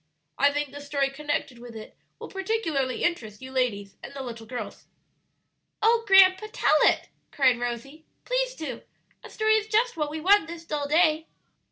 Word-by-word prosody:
I 280 +1 +5
think 290 -1 -2
the 285 +1 -9
story 280 -1 -1
connected 285 -3 -3
with 240 -1 -11
it 215 -1 -10 0.2
will - - -8
particularly 370 - -2
interest 220 -12 -2
you 260 0 -10
ladies 210 -7 -2
and - - -9
the 270 - -5
little 230 -3 -8
girls." 240 -3 -7 0.9
"Oh, 455 +1 +3
grandpa, 385 +2 +6
tell 310 - +3
it!" - - +3 0.2
cried 260 -4 +2
Rosie; 245 +6 -5 0.2
"please - - -1
do; 315 - -6 0.4
a - - -10
story 435 0 +1
is 430 0 -3
just 450 -1 +1
what 300 -2 -1
we 310 +1 -5
want 375 +1 +4
this 335 0 -9
dull 295 -2 -3
day." 315 +1 +2
295 Hz, 175 wpm, -26 LUFS, 255-375 Hz, 0.9 s, grandpa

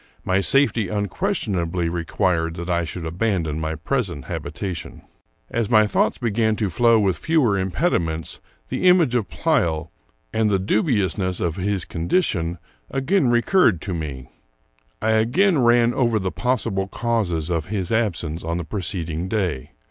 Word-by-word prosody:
My 95 +1 +2
safety 115 -2 +3
unquestionably 95 - -1
re 85 0 -2
quired 85 -3 0
that 85 +1 -4
I 85 -1 +1
should 85 +1 -6
abandon 85 -3 -1
my 80 0 -2
present 85 - -2
habitation. 95 -4 -6 0.5
As 115 -3 -1
my 110 -2 +5
thoughts 105 - +1
began 110 -2 +1
to 105 -3 -1
flow 115 +5 +4
with 95 -5 +1
fewer 150 -11 +2
impediments, 90 - -1 0.3
the 185 - 0
image 170 -8 +4
of 120 -5 0
Pleyel, 85 - 0 0.4
and 110 -1 +2
the 100 - +2
dubiousness 95 - 0
of 85 -3 -1
his 100 -1 -1
condition, 85 - 0 0.3
again 140 +3 +1
recurred 120 - +3
to 95 - -4
me. 70 -6 -5 0.8
I 110 - +2
again 140 - +3
ran 120 -1 +4
over 120 -3 +2
the 95 -3 -2
possible 110 -6 -1
causes 95 -8 -1
of 80 -2 -1
his 95 -3 -3
absence 90 -8 -1
on 85 +1 -2
the 85 - -3
preceding 85 -2 -3
day. 90 - -2
95 Hz, 150 wpm, -22 LUFS, 85-115 Hz, 0.8 s, my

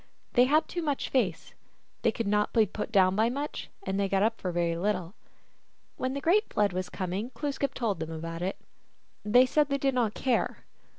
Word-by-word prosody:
They 245 0 +6
had 300 +4 +3
too 350 - -3
much 290 -4 -1
face. 200 -11 -1 0.5
They - - +3
could 230 - -3
not 210 +1 +1
be 225 -2 +5
put 210 +3 -5
down 190 -3 +4
by 220 +3 +3
much, 285 +4 -4
and 190 +1 -2
they 200 -1 +1
got 195 0 +2
up 225 +1 0
for 180 - -2
very 170 -1 0
little. 185 -1 -1 0.8
When 260 +1 -2
the 280 - -3
great 405 +8 +2
Flood 205 -3 +2
was 185 0 -3
coming 190 +6 -3
Glooskap 280 +1 -2
told 210 -8 -1
them 160 - -4
about 165 +1 -5
it. 185 +2 -2 0.7
They 245 +5 +6
said 295 +3 +2
they 280 - +1
did 275 0 +1
not 230 -4 0
care. 255 -3 -1
210 Hz, 200 wpm, -29 LUFS, 185-260 Hz, 0.8 s, They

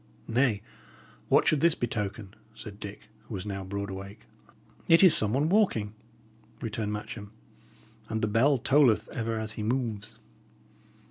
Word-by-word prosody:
"Nay, 115 -4 +1 0.7
what - - +4
should 150 -3 +3
this 170 -1 +4
betoken?" 105 -3 -4 0.2
said 105 -2 -10
Dick, 100 -1 -8 0.3
who 110 - -6
was 95 - -5
now 100 -2 -4
broad 100 +1 -4
awake. 100 +2 -8 0.7
"It 165 +3 +6
is 180 -4 +8
some 105 -1 +2
one 140 +6 +1
walking," 160 - +2 0.7
returned 110 -2 -3
Matcham, 105 0 -6 0.8
and 110 - -1
"the - - +3
bell 125 +7 +3
tolleth 130 -2 +3
ever 115 -1 -3
as 110 0 -3
he 110 - -6
moves." 115 -2 -2
110 Hz, 145 wpm, -28 LUFS, 105-125 Hz, 0.8 s, is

